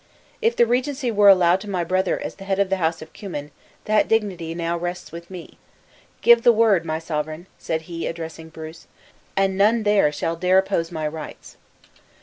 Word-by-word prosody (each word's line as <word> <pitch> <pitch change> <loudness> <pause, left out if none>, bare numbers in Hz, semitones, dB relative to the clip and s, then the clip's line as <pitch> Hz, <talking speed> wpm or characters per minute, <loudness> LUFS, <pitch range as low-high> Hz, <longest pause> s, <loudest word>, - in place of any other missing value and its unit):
"If 460 +1 +2
the 235 - +5
regency 255 +2 -1
were 205 -2 +6
allowed 185 -1 +5
to 210 - -8
my 180 -3 -1
brother 185 +2 0
as - - -5
head 195 -1 -3
of 200 -1 +1
the 195 - +2
house 165 -2 -1
of - - -16
Cummin, 150 -8 -7 0.3
that 215 0 +2
dignity 185 -7 -1
now 170 0 -2
rests 175 +1 -5
with 170 +1 -10
me. 180 -3 -10 0.6
Give 235 0 +6
the 240 - +6
word, 215 -6 +3
my 155 -1 -2
sovereign," 155 0 -4
said 160 0 -3
he, 165 0 -5
addressing 160 -1 -7
Bruce, 160 +1 -10 0.5
"and 195 -1 +2
none 215 +4 +3
there 205 -7 +3
shall 165 +3 -2
dare 180 +2 +2
oppose 190 -3 0
my 155 -2 -3
rights." 155 0 -9
180 Hz, 185 wpm, -22 LUFS, 165-205 Hz, 0.6 s, were